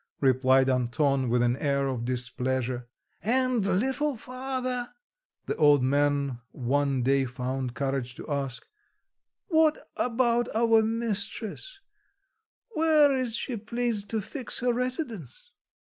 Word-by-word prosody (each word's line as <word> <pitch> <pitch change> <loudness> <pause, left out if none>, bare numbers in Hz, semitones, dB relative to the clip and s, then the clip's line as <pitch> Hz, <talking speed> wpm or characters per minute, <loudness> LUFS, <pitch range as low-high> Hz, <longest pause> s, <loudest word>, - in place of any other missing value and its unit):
replied 130 0 +4
Anton 130 +1 +1
with 120 +1 +2
an 120 0 +2
air 140 -1 0
of 125 -3 -3
displeasure. 125 0 -2 0.3
"And 255 0 +2
little 265 +10 0
father," 255 0 -4 0.6
the - - -2
old 145 -4 +5
man 140 -1 +1
one 135 0 0
day 135 +1 +3
found 125 0 -4
courage 135 -3 -2
to - - -9
ask, 140 -4 -3 0.8
"what 315 -2 +4 0.2
about 240 -1 +1
our 225 0 +4
mistress, 225 - -2 0.9
where 310 -7 +4
is 250 -4 0
she 240 0 -3
pleased 220 -1 -2
to 220 -1 -1
fix 255 +5 -2
her 245 0 +2
residence?" 255 - -3
195 Hz, 115 wpm, -27 LUFS, -, 0.9 s, old